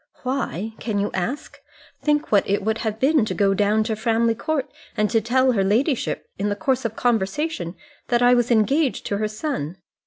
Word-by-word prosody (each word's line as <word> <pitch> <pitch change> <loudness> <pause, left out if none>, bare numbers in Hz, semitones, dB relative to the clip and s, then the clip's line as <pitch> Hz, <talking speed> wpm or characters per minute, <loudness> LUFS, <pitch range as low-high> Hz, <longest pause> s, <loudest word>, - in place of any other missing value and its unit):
"Why? 225 - -2
Can 220 -3 -2
you 200 +1 0
ask? 235 +11 -4 0.4
Think 295 0 +1
what 205 -2 +3
it 200 0 +1
would 220 +2 0
have 220 -1 -3
been 280 0 +3
to - - -3
go 195 -2 +3
down 210 +2 +2
to 220 0 -2
Framley 230 +1 +1
Court, 290 +4 -2 0.3
and 210 0 +1
to 225 -1 +3
tell 260 +3 +3
her 200 -5 +1
ladyship 235 - 0
in 205 +1 0
the 205 - -1
course 260 +3 0
of 225 -1 -2
conversation 225 - -1 0.3
that 240 -1 +2
I 245 0 +6
was 240 -1 +2
engaged 255 +5 +2
to 200 - -1
her 215 +1 0
son. 210 - -4
225 Hz, 195 wpm, -23 LUFS, 205-260 Hz, 0.4 s, I